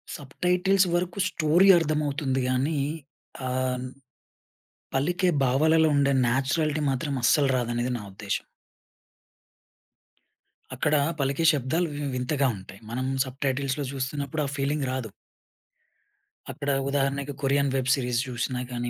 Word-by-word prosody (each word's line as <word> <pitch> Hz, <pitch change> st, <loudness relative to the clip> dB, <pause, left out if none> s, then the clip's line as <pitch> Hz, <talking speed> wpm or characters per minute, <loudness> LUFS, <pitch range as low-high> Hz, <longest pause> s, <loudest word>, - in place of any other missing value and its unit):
Sub 140 Hz, -2 st, -11 dB
titles 185 Hz, +2 st, +3 dB
వరుకు 180 Hz, +2 st, -2 dB
story 170 Hz, +4 st, +3 dB
అర్థమవుతుంది 145 Hz, -4 st, 0 dB
గానీ, 140 Hz, +4 st, 0 dB, 0.7 s
ఆహ్, 130 Hz, 0 st, -1 dB, 1.1 s
పలికే 175 Hz, +6 st, +1 dB
భావాలలో 155 Hz, +5 st, +4 dB
ఉండే 140 Hz, 0 st, +3 dB
న్యాచురాలిటీ 145 Hz, +5 st, 0 dB
మాత్రం 135 Hz, +2 st, -2 dB
అస్సలు 140 Hz, +1 st, +4 dB
రాదనేది 120 Hz, +1 st, -1 dB
నా -, -, -9 dB
ఉద్దేశ్యం. 100 Hz, 0 st, -4 dB, 2.3 s
అక్కడ 150 Hz, +4 st, +1 dB, 0.2 s
పలికే 140 Hz, +4 st, 0 dB
శబ్దాలు 150 Hz, +6 st, 0 dB
వి 145 Hz, -, -4 dB
వింతగా 135 Hz, +2 st, 0 dB
ఉంటాయి. 95 Hz, +1 st, -12 dB
మనం 130 Hz, +2 st, -2 dB, 0.2 s
సబ్ 130 Hz, +1 st, -10 dB
టైటిల్స్‌లో 135 Hz, +1 st, -1 dB
జూస్తున్నప్పుడు 140 Hz, +2 st, -3 dB
ఆ -, -, -3 dB
ఫీలింగ్ 140 Hz, 0 st, -1 dB
రాదు. 125 Hz, -5 st, -4 dB, 1.4 s
అక్కడ 145 Hz, -1 st, -5 dB, 0.2 s
ఉదాహరణకి 140 Hz, 0 st, -1 dB
కొరియన్ 140 Hz, +1 st, +2 dB
వెబ్ 130 Hz, -1 st, 0 dB
సీరీస్ 125 Hz, -3 st, 0 dB
జూసినా 125 Hz, +1 st, -3 dB
గానీ 120 Hz, 0 st, -3 dB
140 Hz, 115 wpm, -26 LUFS, 130-150 Hz, 2.3 s, భావాలలో